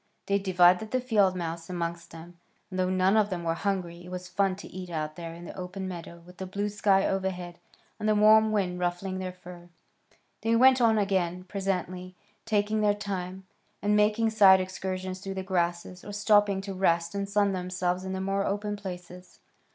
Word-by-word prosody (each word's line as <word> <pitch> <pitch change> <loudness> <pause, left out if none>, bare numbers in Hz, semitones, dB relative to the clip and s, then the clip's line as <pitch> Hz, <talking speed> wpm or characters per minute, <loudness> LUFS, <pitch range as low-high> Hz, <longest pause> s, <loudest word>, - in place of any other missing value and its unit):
They 200 0 +1
divided 185 +2 +4
the 255 - 0
field 210 -7 +2
mouse 165 -1 -5
amongst 170 -1 -4
them, 170 +1 -12 0.3
and 185 - -4
though 185 0 +1
none 185 +2 +3
of 215 -2 +3
them 180 -3 -4
were 165 -1 0
hungry 175 -2 -3
it 180 - -11
was 180 0 -6
fun 195 0 +1
to 200 - -10
eat 180 0 -8
out 155 -2 -3
there 165 -1 -7
in 170 +1 -10
the - - -9
open 185 +1 -5
meadow 170 -1 -8
with 180 +1 -15
the 190 - -4
blue 200 +2 -2
sky 200 -1 +2
overhead, 180 -2 -3 0.4
and 215 - 0
the 215 - +3
warm 215 +1 +6
wind 185 -4 0
ruffling 180 +2 -2
their 185 -1 -4
fur. 180 -1 -13 0.7
They 225 +1 +2
went 260 +2 +6
on 225 -2 +4
again 185 -3 0
presently, 185 -1 -3 0.3
taking 215 0 +1
their 205 -1 +3
time, 190 -2 -5 0.3
and 210 0 +1
making 215 +2 +3
side 195 -3 +7
excursions 185 0 -4
through 195 0 -6
the 190 - -3
grasses, 175 -1 -2
or 205 - -8
stopping 205 -1 +3
to 195 0 -6
rest 170 -2 +1
and 200 0 -3
sun 200 -1 +2
themselves 180 0 -2
in 190 0 -4
the 190 - -3
more 195 +1 0
open 205 +1 -2
places. 180 -2 -9
190 Hz, 195 wpm, -28 LUFS, 180-205 Hz, 0.7 s, side